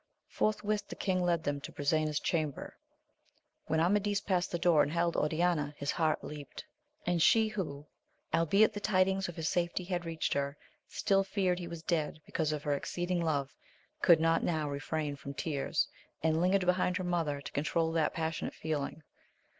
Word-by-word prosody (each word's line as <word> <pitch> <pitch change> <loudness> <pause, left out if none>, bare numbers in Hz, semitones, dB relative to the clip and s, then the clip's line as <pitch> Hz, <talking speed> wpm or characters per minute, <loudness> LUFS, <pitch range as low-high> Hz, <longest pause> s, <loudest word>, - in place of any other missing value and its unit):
Forthwith 210 -1 0
the - - -7
king 185 -2 0
led 170 -2 +1
them 145 -1 -2
to - - -7
Brisena's 155 +1 +1
chamber; 155 -5 -2 0.9
when 160 - +1
Amadis 205 +4 +2
past 185 -3 0
the 175 - 0
door 165 -2 +4
and - - +2
beheld 170 +1 0
Oriana, 155 -1 +1
his 140 - -1
heart 160 -2 +1
leaped; 150 - -8 0.4
and 175 -1 +1
she 220 +5 +5
who, 155 -9 -4 0.5
albeit 165 +6 +4
the 205 - -4
tidings 190 -2 +2
of 175 - -7
his 160 -1 -2
safety 175 +1 0
had 175 -1 -2
reached 165 -1 -1
her, 140 0 -1 0.3
still 195 -2 +2
feared 190 -2 0
he 175 - -5
was 170 -1 -7
dead 160 -2 -1
because 155 -2 -1
of 150 -1 -3
her 145 - +1
exceeding 175 +5 -2
love, 140 -4 -1 0.5
could 170 -3 +7
not 165 0 +3
now 155 -3 0
refrain 145 +1 -2
from 140 0 -8
tears, 145 -1 -1 0.4
and 160 0 +2
lingered 185 +1 +3
behind 180 0 +2
her 185 - -3
mother 165 -5 0
to 140 - -8
controul 160 +3 0
that 165 -2 +1
passionate 160 0 -2
feeling. 155 0 -3
165 Hz, 175 wpm, -32 LUFS, 150-180 Hz, 0.9 s, could